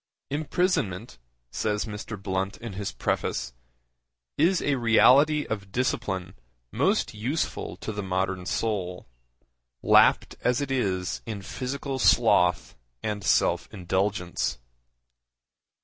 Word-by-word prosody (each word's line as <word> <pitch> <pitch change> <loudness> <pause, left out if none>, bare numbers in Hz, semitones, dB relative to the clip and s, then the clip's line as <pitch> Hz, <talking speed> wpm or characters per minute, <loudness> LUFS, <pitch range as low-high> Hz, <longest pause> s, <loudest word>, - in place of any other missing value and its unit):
'Imprisonment,' 145 - -1 0.3
says 105 -1 -1
Mr. 105 -1 -6
Blunt 95 +1 -2
in 115 -3 -7
his 100 +1 -4
preface, - - -2 0.8
'is 170 +5 +3
a 145 - 0
reality 135 +5 +5
of 100 -2 -5
discipline 95 -6 -2 0.4
most - - +1
useful 125 +10 -3
to - - -5
the 105 -1 -4
modern 95 -1 -1
soul, 90 - -2 0.8
lapped - - +5
as 125 0 +2
it 140 -2 -3
is 95 -8 -1
in 110 -3 -4
physical 135 +4 -4
sloth 110 -8 +3 0.3
and 105 -2 -3
self - - +2
indulgence. 95 -6 -1
105 Hz, 105 wpm, -26 LUFS, 95-130 Hz, 0.8 s, reality